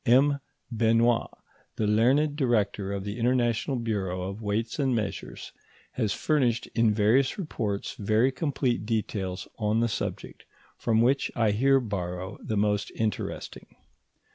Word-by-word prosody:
M. 140 +4 +4 0.3
Benoit, 115 +1 +2 0.5
the 110 - -1
learned 130 +8 +3
Director 110 -7 0
of 100 -1 -3
the 105 +3 -5
International 120 +1 +1
Bureau 100 -6 -2
of 100 +4 -5
Weights 110 +5 -2
and 135 -3 +2
Measures, 105 -3 -4 0.4
has 110 -5 -1
furnished 125 -6 +1
in 115 -2 +3
various 115 - +3
reports 110 - -3
very 110 +5 +2
complete 130 -5 -1
details 100 -5 -2
on 105 +1 +1
the 120 - +2
subject, 110 - -5 0.3
from 110 -1 +1
which 135 +3 +2
I 110 -3 +2
here 135 +6 +4
borrow 95 -5 -4
the 110 - -3
most 105 0 +1
interesting. 110 -1 -4
115 Hz, 135 wpm, -27 LUFS, 105-125 Hz, 0.5 s, M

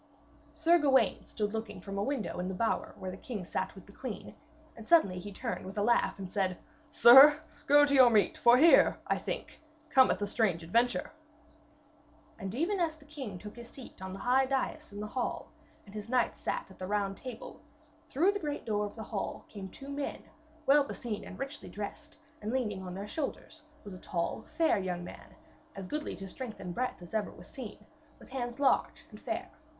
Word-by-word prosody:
Sir 325 +3 +4
Gawaine 265 -7 +3
stood 210 0 -3
looking 225 0 -4
from 195 0 -5
a - - +1
window 265 -7 -2
in 180 - -2
the 190 - -3
bower 225 +4 -1
where 185 - -5
the 185 - -8
king 205 -4 -6
sat 190 +2 -3
with 190 - -12
the 200 - -15
queen, 235 0 -7 0.4
and 225 - -11
suddenly 200 - +4
he 205 +3 -7
turned 230 +4 -4
with 190 +2 -8
a 205 - +1
laugh, 235 +2 +2
and 195 -1 -6
said: 185 -2 -1 0.3
'Sir, 290 +2 +9 0.3
go 290 +1 +7
to 285 - 0
your 260 -3 +8
meat, 210 -5 +3
for 240 +1 +6
here, 325 +5 +6
I - - 0
think, - - -5 0.3
cometh 260 -8 +5
a 205 - 0
strange 200 -5 0
adventure.' 235 +9 +1 1.3
And 195 +2 -5
even 355 +8 0
as 330 -3 0
the 305 -2 -19
king 270 -10 -7
took 210 +4 -10
his 235 0 -10
seat 255 -7 -12
on 190 0 -5
the - - -6
high 255 +6 +3
dais 275 +2 -2
in 205 - -8
the - - -3
hall, 240 +4 -3 0.3
and 200 - -14
his 210 +1 -7
knights 250 -1 +1
sat - - -3
at - - -16
the 185 - -4
Round 200 -1 0
Table, 245 -1 -9 0.5
through 345 +9 +3
the 405 - -3
great 295 -4 -4
door 210 -2 0
of 205 - -12
the 220 - -6
hall 210 -2 -4
came 195 -3 -8
two 275 +8 -11
men, 280 0 -4 0.4
well 285 +1 +6
beseen 235 -6 -5
and 185 - -9
richly 275 +2 -6
dressed, 300 +10 -7 0.2
and, 210 +1 -3
leaning 220 -7 -1
on 180 -1 -7
their 195 +1 -5
shoulders, 310 +5 -5 0.2
was 200 - -9
a 185 - -9
tall, 170 -2 -3
fair, 325 -10 +3
young 180 -2 -3
man, - - -11 0.4
as 195 -1 -6
goodly 300 +10 -4
to 195 - -8
strength 230 +3 -7
and 180 -1 -5
breadth 250 -4 -3
as 175 - -13
ever 215 -2 0
was - - -13
seen, - - -9 0.3
with - - -16
hands 245 -1 -4
large 275 -2 +2
and - - -12
fair. - - -4
225 Hz, 205 wpm, -31 LUFS, 195-275 Hz, 1.3 s, Sir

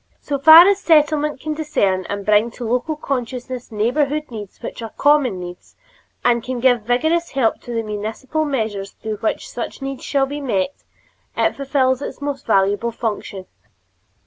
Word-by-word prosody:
So 280 -1 -3
far 320 +5 +10
as 400 0 +3
a - - -21
Settlement 300 -2 +3
can 310 +2 -3
discern 200 - 0
and 200 -1 -4
bring 210 +2 +3
to 240 - -4
local 250 +7 -1
consciousness 255 -3 -4
neighborhood 280 +7 0
needs 210 -4 -8
which - - -6
are 225 - -5
common 280 -7 +2
needs, 180 0 -10 0.5
and 235 -2 +3
can 255 0 -4
give 245 -1 +3
vigorous 315 +10 +1
help 255 -5 +1
to 245 - -9
the 230 -1 -1
municipal 220 +8 -3
measures 220 -9 -3
through 215 -1 -5
which 220 - -2
such 240 - -6
needs 270 -1 -6
shall 275 -2 +1
be 290 +2 -6
met, 230 -2 -1 0.6
it - - +1
fulfills 265 -2 +1
its - - -6
most 285 -2 -5
valuable 205 +2 +2
function. 205 -4 -4
250 Hz, 170 wpm, -20 LUFS, 220-290 Hz, 0.6 s, far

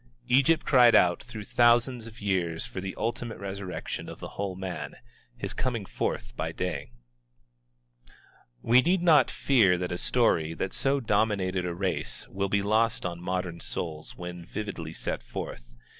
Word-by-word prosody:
Egypt 135 +6 +4
cried 125 -4 +6
out 90 -1 +4
through 115 -4 -8
thousands 120 +1 +3
of 115 +1 -12
years 90 -5 -1
for 95 - -6
the 95 0 -5
ultimate 115 0 -3
resurrection 100 -1 -5
of - - -8
the - - -7
whole 100 -2 -4
man, 95 -1 -5 0.4
his - - -4
coming 120 -5 -2
forth - - -3
by - - -2
day. - - -3 1.7
We 120 +2 +6
need 175 +4 +2
not 155 -7 +6
fear 110 -10 +3
that 90 0 -3
a 90 - -3
story 80 -10 +2
that 95 +3 -3
so 135 0 +1
dominated 100 -5 +1
a 85 - -3
race 95 0 -2
will 100 0 -2
be 100 0 +1
lost 110 +2 +2
on 85 -1 -4
modern 90 -1 -3
souls 80 -2 -4
when 90 -1 -7
vividly 85 -4 -5
set - - -3
forth. - - -7
100 Hz, 160 wpm, -28 LUFS, 90-120 Hz, 1.7 s, cried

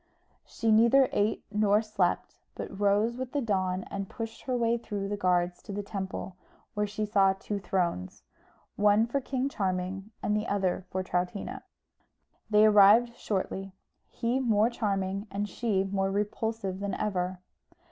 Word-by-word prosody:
She 225 -1 0
neither 235 +5 +5
ate 205 +2 0
nor 210 0 +3
slept, 215 -1 -1 0.2
but 195 - -7
rose 205 +4 +2
with 255 -1 -5
the 290 - +1
dawn, 185 -4 0
and 195 -1 -4
pushed 225 -1 -6
her 255 -2 0
way 235 0 +1
through 205 -3 -4
the 205 - -1
guards 180 -2 +1
to 210 - -9
the 205 +1 -3
temple, 190 -2 -5 0.4
where 210 0 0
she 210 +1 -3
saw 195 -2 +4
two 200 +1 -4
thrones, 175 - -2 0.5
one 210 +2 +4
for 275 +4 -1
King 265 0 -1
Charming, 195 -4 -2
and 210 - +1
the 210 +2 -1
other 190 -2 -1
for 185 0 -2
Troutina. 180 +2 -3 0.9
They 210 0 +6
arrived 215 +3 +6
shortly; 195 -2 -3 0.4
he 240 +3 -1
more 225 -2 +3
charming 195 -2 -2
and 205 +2 -2
she 205 -3 0
more 195 0 -1
repulsive 205 -1 -2
than 200 -2 -2
ever. 185 -3 -2
205 Hz, 155 wpm, -29 LUFS, 190-225 Hz, 0.9 s, They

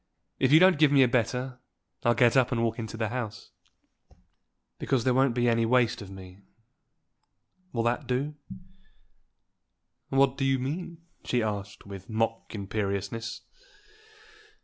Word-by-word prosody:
If 130 0 +2
you 155 - +8
don't 185 -3 +5
give 155 -2 +5
me 140 -2 +6
a - - +4
better, 125 +1 -1 0.4
I'll 120 -2 +3
get 120 +1 +4
up 130 -2 +3
and 115 -2 0
walk 115 +1 -1
into 110 0 -6
the 110 -2 -1
house." 115 -2 -6 1.3
"Because 130 -4 0
there 130 - +2
won't 130 -1 +2
be 120 -1 +2
any 115 -1 +2
waste 120 -1 +2
of 100 - -9
me. 95 -1 -11 1.3
Will 115 -2 -1
that 120 +1 -1
do?" 135 +4 -1 1.8
"What 135 -1 +3
do - - 0
you 135 0 +2
mean?" 165 +5 -5 0.2
she 120 -2 0
asked, 100 -1 -5
with 100 0 -10
mock 115 0 -2
imperiousness. 100 +2 -3
120 Hz, 145 wpm, -28 LUFS, 110-130 Hz, 1.8 s, you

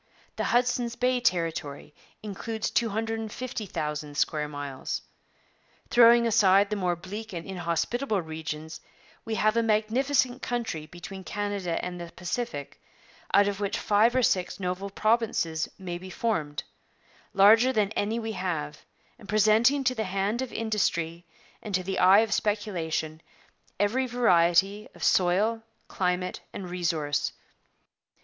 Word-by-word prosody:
The - - -2
Hudson's 245 -1 +1
Bay 250 0 +1
territory 165 -9 -1 0.3
includes 215 +2 -4
250,000 220 - -3
square 150 0 0
miles. 145 -2 -5 0.9
Throwing 235 0 +7
aside 200 -2 +4
the - - +1
more 180 -3 0
bleak 200 +5 -8
and 170 -1 -5
inhospitable 195 +6 -1
regions, 160 0 -6 0.4
we 225 -1 -2
have 215 0 +2
a 230 - +3
magnificent 245 +4 +1
country 225 -11 -3
between 175 +3 -9
Canada 200 -4 -2
and 180 -1 -5
the 170 -1 -8
Pacific, 185 - -4 0.5
out 200 0 +5
of 200 -1 -2
which 200 -1 -1
five 215 +4 +3
or 255 - +3
six 185 -4 +1
noble 185 +1 -3
provinces 210 -7 0
may 175 -2 -5
be 185 +1 -9
formed, 160 -10 -2 0.7
larger 220 +6 +6
than 210 -4 +1
any 220 +1 -1
we 225 -1 -3
have, 180 -7 -4 0.4
and 205 - -15
presenting 220 +6 +4
to 255 0 +2
the 220 -3 -2
hand 195 +5 -1
of 260 - -4
industry 175 -6 -1 0.3
and 210 -3 -3
to 185 - 0
the 190 +1 -2
eye 190 +3 +7
of 220 -1 0
speculation 165 -8 -2 0.6
every 240 +6 +1
variety 195 -3 +3
of - - -9
soil, 200 +5 +2 0.3
climate, 180 0 -1
and 185 -3 -6
resource. 160 -5 -1
200 Hz, 130 wpm, -27 LUFS, 175-225 Hz, 0.9 s, Throwing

